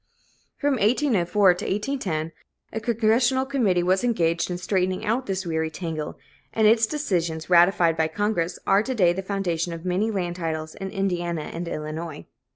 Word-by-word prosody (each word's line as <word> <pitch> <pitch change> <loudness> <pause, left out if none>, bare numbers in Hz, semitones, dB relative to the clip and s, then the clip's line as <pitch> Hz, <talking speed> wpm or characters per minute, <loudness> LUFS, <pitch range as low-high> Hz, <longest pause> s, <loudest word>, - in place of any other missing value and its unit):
From 285 -2 +1
1804 205 - +3
to 175 - -6
1810, 195 - -2 0.4
a 220 - -2
Congressional 235 +3 +2
committee 225 -11 +1
was 185 +3 +2
engaged 170 -9 +1
in 180 - -2
straightening 185 0 -1
out 235 +5 0
this 190 -1 -2
weary 160 -1 -1
tangle; 160 -2 -5 0.4
and 220 - +2
its 220 +1 +5
decisions, 175 - -2
ratified 175 -1 +5
by 160 0 +2
Congress, 180 0 -1
are 195 - +4
to 260 +4 -3
day 180 -6 +4
the 190 - -3
foundation 180 -4 -2
of 165 +1 -8
many 185 +5 +1
land 180 -4 -2
titles 155 -2 -3
in 195 -1 -6
Indiana 175 -5 -2
and 170 +1 -5
Illinois. 155 0 -5
185 Hz, 165 wpm, -24 LUFS, 170-215 Hz, 0.4 s, its